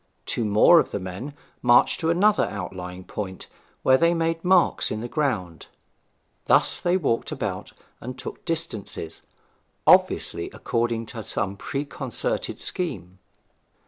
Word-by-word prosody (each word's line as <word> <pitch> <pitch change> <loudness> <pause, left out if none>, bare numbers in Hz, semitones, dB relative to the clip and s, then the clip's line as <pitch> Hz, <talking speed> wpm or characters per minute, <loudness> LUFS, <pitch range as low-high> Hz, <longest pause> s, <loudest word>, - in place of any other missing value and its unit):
Two 120 - -1
more 105 +11 +6
of - - 0
the - - -3
men 95 +10 -7 0.3
marched 120 0 +4
to 160 - 0
another 200 +5 +3
outlying 90 -2 -6
point, 95 -1 -6 0.4
where 130 0 +5
they 170 +1 +3
made 165 0 -1
marks 180 -1 +3
in 110 - -3
the 120 - -4
ground. 105 - -2 0.8
Thus - - +3
they 175 +1 +2
walked 135 -10 -1
about - - -4 0.3
and 125 +2 -7
took - - -8
distances, 110 - -3 0.6
obviously - - +3
according 115 -1 -1
to 115 - -5
some 100 -1 -2
preconcerted 145 - -3
scheme. 95 - -4
120 Hz, 130 wpm, -24 LUFS, 100-165 Hz, 0.8 s, more